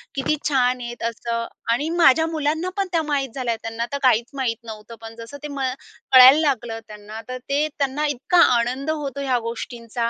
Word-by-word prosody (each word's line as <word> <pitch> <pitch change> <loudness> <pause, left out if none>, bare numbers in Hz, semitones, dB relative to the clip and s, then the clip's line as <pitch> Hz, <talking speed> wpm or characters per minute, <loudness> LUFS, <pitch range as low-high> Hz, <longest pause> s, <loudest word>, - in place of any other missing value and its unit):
किती 275 +3 0
छान 250 -2 +2
आहेत 240 -1 -7
असं 230 0 -4 0.3
आणि 290 +7 0
माझ्या 320 -3 +4
मुलांना 315 +2 -1
पण 395 -1 0
त्या 335 -2 +2
माहीत 285 -3 -1
झाल्या, 245 -4 -1
त्यांना 225 +1 -3
तर - - 0
काहीच 240 -1 +3
माहीत 255 -4 -1
नव्हतं. 220 +1 -9
पण 225 0 -9
जसं 230 +5 -9
ते - - -3
म 280 -1 -7 0.5
कळायला 260 +3 +10
लागलं 240 -7 -1
त्यांना, 210 +1 -9
तर 255 0 -5
ते 290 +2 +1
त्यांना 285 +2 0
इतका 290 +5 0 0.2
आनंद 255 +5 -2
होतो 280 -3 -4
ह्या 255 -3 +1
गोष्टींचा. 235 -1 -8
260 Hz, 185 wpm, -22 LUFS, 230-290 Hz, 0.5 s, कळायला